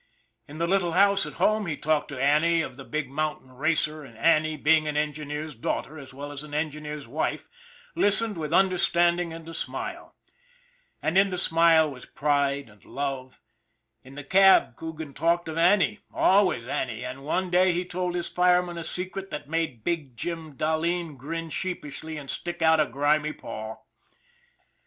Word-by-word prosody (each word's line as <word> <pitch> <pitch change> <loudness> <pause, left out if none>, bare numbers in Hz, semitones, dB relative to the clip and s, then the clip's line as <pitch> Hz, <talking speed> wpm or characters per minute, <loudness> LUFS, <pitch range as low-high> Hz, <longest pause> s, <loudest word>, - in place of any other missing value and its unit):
In 145 - -10
the 170 - 0
little 180 -2 +1
house 200 +1 +4
at - - -8
home 215 -2 +2
he 155 -3 -2
talked 155 -1 0
to 140 -3 -6
Annie 155 +4 +3
of - - -7
the 135 - -10
big 155 +1 -3
mountain 145 -1 -3
racer 155 +2 0
and 115 -5 -14
Annie, 155 +4 +3
being 155 +1 +3
an 150 -1 -2
engineer's 150 0 -3
daughter 140 +6 -4
as 135 -2 -11
well 145 +2 -7
as 145 -1 -6
an 150 -1 -8
en 155 0 0
gineer's 150 -2 -7
wife, 150 - -3 0.4
listened 210 +1 +3
with 155 -2 -4
understanding 175 -2 +2
and 165 0 -9
a 165 - -8
smile, - - -6 0.9
and 175 +4 +3
in 195 0 +4
the 180 - -3
smile 165 -2 +4
was 125 -2 -11
pride 140 -2 0
and 105 -1 -20
love; 135 -2 -5 0.6
in 130 +1 -14
the 145 - -7
cab 195 +5 +5
Coogan 160 -3 -7
talked 170 +3 +1
of 160 +1 -3
Annie, 205 +4 +3
always 190 - +3
Annie, 125 -1 -3
and 130 +2 -7
one 180 +5 -1
day 185 +1 +4
he 175 +1 -1
told 180 0 -3
his 175 -1 -2
fireman 180 -1 +2
a - - -5
secret 185 +3 -3
that - - -7
made 160 -8 -2
big 155 -8 -3
Jim 165 +2 -4
Dahleen 160 +1 -1
grin 165 +5 -5
sheep 185 +3 -3
ishly 150 +2 -7
and 140 - -10
stick 175 +3 -1
out 160 0 +5
a 150 - +3
grimy 150 +4 +1
paw. 110 +1 -7
155 Hz, 180 wpm, -26 LUFS, 145-175 Hz, 0.9 s, cab